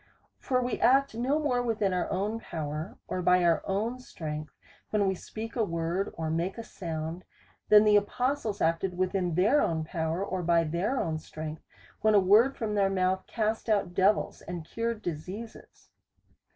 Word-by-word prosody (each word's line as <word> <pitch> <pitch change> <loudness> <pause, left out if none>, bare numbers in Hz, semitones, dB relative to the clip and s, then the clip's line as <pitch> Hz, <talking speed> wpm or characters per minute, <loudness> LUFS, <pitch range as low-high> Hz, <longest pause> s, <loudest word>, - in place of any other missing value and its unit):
For 255 -1 0
we 245 - -2
act 275 +1 +4
no 250 +6 +1
more 275 -5 +1
within 215 -5 0
our 180 -1 -1
own 205 +4 -1
power, 155 -2 -5
or 185 - -2
by 180 0 +4
our 170 -1 +3
own 220 +6 -1
strength, 155 - -6 0.4
when 205 -2 +2
we 190 - +2
speak 220 +4 -7
a 235 - +2
word, 170 +1 -1
or 160 -1 -2
make 170 +5 -1
a 230 - -5
sound, 165 -3 -5 0.5
than 210 0 +8
the 210 -1 +6
apostles 245 +2 -1
acted 165 +3 0
within 185 -2 0
their 215 - +4
own 160 -1 0
power, 160 +3 -2
or 185 -2 -3
by 170 -1 +3
their 175 - -1
own 155 -1 -1
strength, 155 0 -7 0.4
when 215 0 +4
a - - +8
word 215 +8 +5
from 220 -2 -2
their 200 -2 +3
mouth 190 0 0
cast 220 0 -1
out 200 -4 +1
devils, 195 +4 +2
and 175 -2 -6
cured 230 +3 -3
diseases. 185 +8 -7
190 Hz, 175 wpm, -29 LUFS, 170-220 Hz, 0.5 s, than